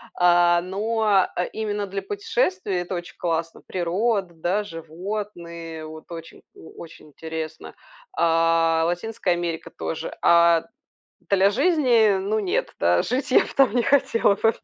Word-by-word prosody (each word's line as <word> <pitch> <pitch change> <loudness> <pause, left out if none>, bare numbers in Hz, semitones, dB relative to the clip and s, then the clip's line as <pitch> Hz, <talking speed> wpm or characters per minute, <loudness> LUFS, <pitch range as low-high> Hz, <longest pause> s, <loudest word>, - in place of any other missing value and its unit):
а 175 -1 +4
но, 205 +1 +1
э, 180 - -1
именно 210 -2 -2
для 195 +1 -4
путешествий 380 - -1
это 180 +1 -3
очень 175 0 -7
классно: 165 -1 -3
природа, 190 +2 -1
да, 175 +5 -1
животные 170 -2 -7
вот, 155 0 -10
очень 165 -1 -10
о - - -14
очень 165 -2 -12
интересно. 160 +1 -7 0.4
А 165 0 +3
Латинская 180 +2 -2
Америка 170 -2 -2
тоже. 160 - -6
А 170 -1 +5 0.7
для 195 0 +4
жизни- 245 - +3
ну 205 +3 -1
нет, 195 -4 -2
да, 85 +1 +3
жить 255 +4 -2
я - - +6
б - - -1
там 270 -5 +4
не 240 - +3
хотела 230 -6 +3
бы. 225 +2 +2
180 Hz, 140 wpm, -23 LUFS, 165-215 Hz, 0.7 s, я